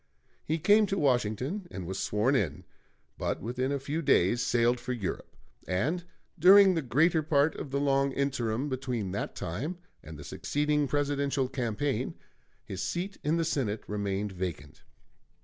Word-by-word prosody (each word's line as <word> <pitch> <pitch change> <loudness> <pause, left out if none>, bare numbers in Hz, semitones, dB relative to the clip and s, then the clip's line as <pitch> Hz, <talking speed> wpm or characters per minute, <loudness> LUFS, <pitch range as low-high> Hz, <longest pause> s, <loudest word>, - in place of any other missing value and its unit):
He 160 - -1
came 205 +6 +4
to 195 - -1
Washington 130 - 0
and 95 - -6
was 95 +2 -4
sworn 110 +7 +1
in, 80 - -1 0.6
but - - -1
within 125 +5 -2
a 140 - +1
few 145 +4 -3
days 120 - +3
sailed 120 +1 +2
for 125 +1 -3
Europe, 105 -7 -5 0.3
and 150 - -1 0.3
during 190 +3 +8
the 165 - 0
greater 155 +6 +3
part 150 0 +2
of - - -7
the 140 +1 -1
long 140 -1 +2
interim 130 -2 -1
between 125 -7 -3
that 100 - -4
time 125 - -4 0.2
and 80 0 -10
the 75 - -9
succeeding 150 0 0
Presidential 140 -1 0
campaign 130 +2 -2 0.5
his 95 0 -5
seat 185 - -3
in 155 +3 +1
the 165 - +1
Senate 120 -9 -1
remained 100 0 -2
vacant. 90 -6 -6
135 Hz, 155 wpm, -29 LUFS, 105-150 Hz, 0.6 s, during